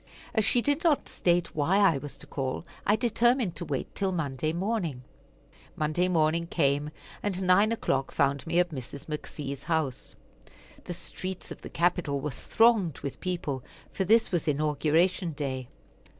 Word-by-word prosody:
As 220 Hz, -, +3 dB
she 240 Hz, +3 st, +3 dB
did 290 Hz, +2 st, +1 dB
not 315 Hz, -5 st, +3 dB
state 175 Hz, -1 st, +1 dB
why 160 Hz, +6 st, +2 dB
I 195 Hz, -8 st, +4 dB
was 145 Hz, +1 st, -8 dB
to -, -, -12 dB
call, 135 Hz, +3 st, -3 dB, 0.2 s
I 205 Hz, -, +5 dB
determined 240 Hz, -2 st, +2 dB
to 175 Hz, -, -4 dB
wait 140 Hz, -4 st, -3 dB
till 195 Hz, -2 st, 0 dB
Monday 155 Hz, -3 st, -1 dB
morning. 175 Hz, -, -2 dB, 0.7 s
Monday 155 Hz, +4 st, +1 dB
morning 165 Hz, -1 st, +2 dB
came, 145 Hz, -2 st, +1 dB, 0.3 s
and 190 Hz, -2 st, -2 dB
nine 195 Hz, +4 st, +5 dB
o'clock 135 Hz, -12 st, 0 dB
found 140 Hz, +2 st, +1 dB
me 170 Hz, +1 st, 0 dB
at 175 Hz, -1 st, +3 dB
Mrs. 135 Hz, 0 st, -7 dB
McC.'s 145 Hz, -2 st, -5 dB
house. 160 Hz, -6 st, -1 dB, 0.7 s
The 175 Hz, -, -4 dB
streets 185 Hz, +1 st, -6 dB
of -, -, -8 dB
the -, -, -8 dB
capital 170 Hz, -4 st, +1 dB
were 150 Hz, +1 st, -3 dB
thronged 215 Hz, -, +3 dB
with 140 Hz, -, -5 dB
people, 160 Hz, -8 st, -3 dB, 0.3 s
for 190 Hz, -, -1 dB
this 225 Hz, +4 st, +4 dB
was 175 Hz, -4 st, 0 dB
Inauguration 155 Hz, +4 st, +2 dB
day. 130 Hz, -3 st, -3 dB
170 Hz, 160 wpm, -28 LUFS, 145-190 Hz, 0.7 s, I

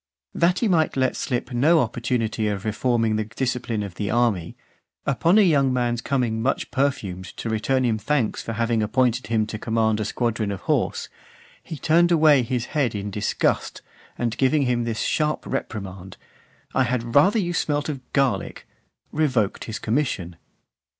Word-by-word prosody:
That 175 Hz, +2 st, +2 dB
he 230 Hz, -, +1 dB
might 160 Hz, -7 st, +2 dB
let 130 Hz, 0 st, +1 dB
slip 125 Hz, 0 st, -3 dB
no 155 Hz, +7 st, +4 dB
opportunity 115 Hz, -3 st, -1 dB
of 100 Hz, -1 st, -3 dB
reforming 115 Hz, 0 st, +1 dB
the 110 Hz, -, 0 dB
discipline 120 Hz, -1 st, -2 dB
of 100 Hz, -3 st, -6 dB
the 100 Hz, +2 st, -3 dB
army, 110 Hz, -8 st, 0 dB, 0.5 s
upon 165 Hz, -, +3 dB
a -, -, +7 dB
young 140 Hz, -7 st, +3 dB
man's 120 Hz, -2 st, 0 dB
coming 120 Hz, -4 st, -1 dB
much 135 Hz, +4 st, -1 dB
perfumed 100 Hz, -10 st, -1 dB
to 115 Hz, -, -3 dB
return 130 Hz, +4 st, +1 dB
him 110 Hz, -2 st, +1 dB
thanks 135 Hz, -1 st, 0 dB
(452) -, -, -14 dB
for 115 Hz, -, -3 dB
having 115 Hz, -1 st, +1 dB
appointed 125 Hz, +1 st, +1 dB
him 110 Hz, -1 st, +1 dB
to 110 Hz, 0 st, -6 dB
command 110 Hz, -1 st, +1 dB
a 110 Hz, -, -1 dB
squadron 115 Hz, -1 st, -1 dB
of 100 Hz, -, -5 dB
horse, -, -, -1 dB, 0.5 s
he 160 Hz, -, -8 dB
turned 170 Hz, +5 st, +3 dB
away 155 Hz, -4 st, +5 dB
his 120 Hz, 0 st, -2 dB
head 135 Hz, -8 st, +1 dB
in 100 Hz, 0 st, -4 dB
disgust, 105 Hz, +1 st, -1 dB, 0.3 s
and, 115 Hz, -2 st, -2 dB
giving 140 Hz, +2 st, +3 dB
him 120 Hz, -2 st, 0 dB
this 115 Hz, -2 st, -2 dB
sharp 150 Hz, -1 st, 0 dB
reprimand, 95 Hz, -3 st, -5 dB, 0.6 s
"I -, -, +2 dB
had 120 Hz, -2 st, -1 dB
rather 185 Hz, -, +5 dB
you 175 Hz, -5 st, 0 dB
had 175 Hz, -, -1 dB
smelt 145 Hz, -1 st, 0 dB
of 145 Hz, -3 st, -3 dB
garlic," 135 Hz, -2 st, -1 dB, 0.4 s
revoked 130 Hz, -10 st, 0 dB
his 110 Hz, -, -5 dB
commission. 110 Hz, -, -2 dB
120 Hz, 170 wpm, -23 LUFS, 110-140 Hz, 0.6 s, a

